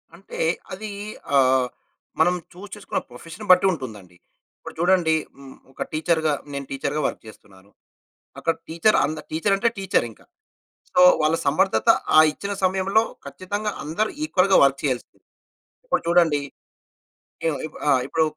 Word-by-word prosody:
అంటే 190 +3 -11 0.3
అది 215 +2 -6 0.5
ఆహ్, 130 -1 +4 0.5
మనం 175 +3 +4 0.2
చూస్ 195 +2 -11
చేసుకున్న 205 - -3
ప్రొఫెషన్‌ని 165 - -10
బట్టి 180 +1 +6
ఉంటుందండి. 105 - -8 0.4
ఇప్పుడు - - -10
చూడండి 175 -2 +3 0.2
హ్మ్, 135 -1 -13 0.2
ఒక - - -4
టీచర్‌గా, 160 -1 +1 0.2
నేను 140 0 -4
టీచర్‌గా 140 +2 -2
వర్క్ - - -7
చేస్తున్నాను. 100 -2 -16 0.7
అక్కడ 165 - +1
టీచర్ 170 +7 +2
అంద 155 +1 -4
టీచర్ 165 +6 +1
అంటే 225 +4 +1
టీచర్ 190 -10 +1
ఇంక. - - -20 0.7
సో 270 - +2 0.2
వాళ్ళ 155 +2 +2
సమర్ధత 110 -6 +1 0.3
ఆ - - +9
ఇచ్చిన 200 +6 -5
సమయంలో 190 +3 +2 0.2
ఖచ్చితంగా 205 +3 -4
అందరూ 170 +9 -1
ఈక్వల్‌గా 190 -8 +3
వర్క్ 140 0 +2
చేయాల్సింది. 130 -4 -3 0.7
ఇప్పుడు - - 0
చూడండి, 170 -4 +3 1.1
ఈ - - +3
ఉంది - - -6
ఇప్పుడు - - -12
ఆహ్, 130 -3 +4
ఇప్పుడు 160 +2 +1
160 Hz, 140 wpm, -23 LUFS, 140-190 Hz, 1.1 s, ఆ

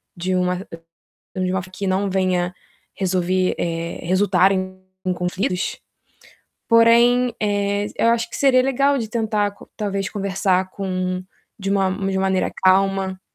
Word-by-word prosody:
de 185 +2 -2
uma 180 0 +1 0.8
de 185 -1 -1
uma 185 -1 0
forma 185 0 -13
que 195 +1 -4
não 195 +1 0
venha 185 -1 0 0.4
resolver 185 -1 0
eh, 170 0 -3
resultar 185 +1 +3
em 185 0 -4 0.2
em 185 - +1
conflitos. 180 +1 -2 0.9
Porém, 235 +1 +5
eh, 205 0 0
eu 230 - +2
acho 230 0 +1
que - - -6
seria 260 -2 +4
legal 275 +2 +2
de 225 -2 -3
tentar 215 -3 0
co - - -16
talvez 200 -2 -2
conversar 190 -2 0
com 185 -1 -3 0.4
de 195 0 -4
uma 195 -1 +2
de 195 0 -2
uma - - 0
maneira 190 -1 +1
calma. 190 0 +2
190 Hz, 150 wpm, -21 LUFS, 185-205 Hz, 0.9 s, Porém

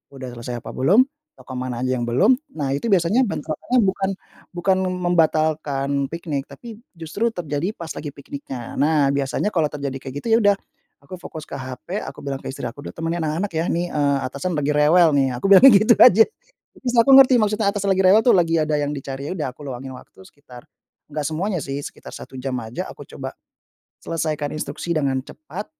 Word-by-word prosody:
udah 130 -1 -7
selesai 120 0 -6
apa 115 - -7
belum, 200 - +4 0.3
toko 130 0 -11
mana 125 -1 -3
aja 130 - 0
yang 120 - -2
belum. 200 - +4 0.2
Nah, 135 -2 -1
itu 185 +11 -2
biasanya 195 +6 +3
bentrokannya 155 +12 -2
bukan 195 0 0 0.5
bukan 185 +2 +2
membatalkan 155 -5 0 0.2
piknik, 155 -5 -4
tapi 230 -2 -11 0.2
justru 185 +9 -2
terjadi 165 -3 -3
pas 165 -2 -6
lagi 150 - -6
pikniknya. 135 -3 -8
Nah, 145 -2 +3
biasanya 140 +9 -1
kalau 155 -4 +1
terjadi 140 -2 -5
kayak 135 0 -8
gitu, - - -5
ya - - +7
udah, 205 -1 +4 0.4
aku 140 +6 -15
fokus 155 -1 -8
ke - - -12
HP, 140 +8 -5
aku - - -8
bilang 135 -1 -4
ke - - -6
istri 130 - -6
aku, 130 +4 -7
udah - - -7
temenin 165 +1 -2
anak-anak 165 +5 -2
ya, 160 +2 -1
nih, 175 +1 0
eee, 140 -2 +2
atasan 140 +6 -3
lagi 150 0 0
rewel 155 +2 +5
nih, 135 -2 +3
aku 125 - -6
bilangnya 260 +7 +9
gitu 220 +3 +5
aja. 225 -1 +8 0.5
Terus, 250 -2 -3
aku 230 +4 +5
ngerti 265 -2 +8
maksudnya 210 -1 +1
atasan 200 -1 -2
lagi 190 - +1
rewel 195 +4 +6
tuh, 245 - +6
lagi 165 -2 +3
ada 155 -1 0
yang 145 0 -1
dicari. 135 +1 -6
Ya - - -3
udah, 150 - -2
aku 145 - -17
luangin 130 0 -7
waktu 125 - -15
sekitar 130 -4 -15 0.4
nggak 150 0 -3
semuanya 180 +4 -2
sih, 135 0 -4
sekitar - - -9
1 130 - -10
jam 130 0 -4
aja. 110 +1 -6
Aku - - -12
coba, - - -7 0.7
selesaikan 155 -3 -2
instruksi 155 +3 -4
dengan 140 -4 0
cepat, 155 +7 -8
155 Hz, 200 wpm, -22 LUFS, 140-185 Hz, 0.7 s, bilangnya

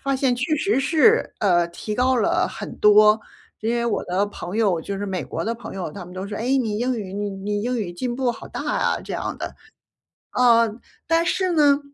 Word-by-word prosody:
发 275 -1 0
现 260 -2 +2
确 265 +5 0
实 305 -2 +1
是， 340 - +3
呃， 175 -4 +3
提 210 +5 -5
高 255 +2 +2
了 230 - +2
很 - - -7
多。 210 +1 +6 0.4
因 225 +2 -1
为 235 - 0
我 230 - 0
的 190 +3 +1
朋 205 -1 -7
友 195 -7 +2
就 195 +3 -5
是 205 - -3
美 190 -2 -2
国 - - -4
的 230 - -1
朋 225 -3 -9
友， 175 -5 -4
他 195 - -8
们 180 - -12
都 190 +1 -5
说， 205 - -5
哎， 255 +5 +1
你 220 -5 -1
英 245 0 0
语 190 -2 -6
你 205 0 -3
你 205 +2 -3
英 245 0 -1
语 180 -5 -3
进 240 +6 -3
步 255 -2 +1
好 - - -11
大 - - -6 0.2
呀， - - +1
这 - - -6
样 - - -3
的。 - - -5 0.8
呃， 230 -3 +4 0.3
但 330 0 +2
是 370 +1 +1
呢， 290 -3 +5
225 Hz, 240 characters per minute, -23 LUFS, 200-255 Hz, 0.8 s, 多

